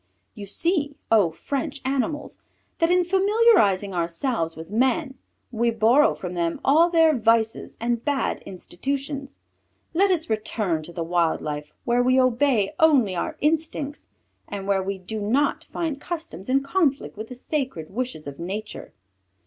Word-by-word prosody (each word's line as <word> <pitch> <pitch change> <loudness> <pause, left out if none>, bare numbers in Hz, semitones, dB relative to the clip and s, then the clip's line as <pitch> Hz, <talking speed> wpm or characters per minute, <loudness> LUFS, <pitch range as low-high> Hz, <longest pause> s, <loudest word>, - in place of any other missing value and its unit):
You 205 -3 -9
see, 295 - 0 0.2
O! 210 -6 +5
French 275 - -4
Animals, 275 +3 -2 0.4
that 330 - +3
in 360 0 +4
familiarizing 380 - +3
ourselves 170 +1 -1
with 160 +3 -10
men, 265 +5 +1 0.4
we 235 0 +1
borrow 230 +7 +4
from 180 -1 -6
them 170 -1 -1
all 320 +5 +5
their 325 -3 +4
vices 225 -1 +1
and 235 0 -1
bad 285 -2 -1
institutions. 275 - -5 0.5
Let 390 +4 +3
us 340 -4 +1
return 215 -6 -1
to 175 - -10
the 170 0 -4
wild 170 -1 +1
life 150 0 -6
where 240 +1 +2
we 255 +1 +3
obey 250 -4 +2
only 270 -12 +4
our 170 - -3
instincts, 300 -1 -1 0.4
and 200 -1 -6
where 195 -1 +2
we 195 +1 -3
do 210 +4 -6
not 260 +8 +1
find 315 -5 -4
customs 325 - -6
in 270 +1 +2
conflict 285 -2 0
with 215 +1 -7
the 250 - -9
sacred 255 - -4
wishes 245 -9 -4
of 140 +1 -8
Nature. 205 +5 -6
245 Hz, 150 wpm, -24 LUFS, 195-295 Hz, 0.5 s, O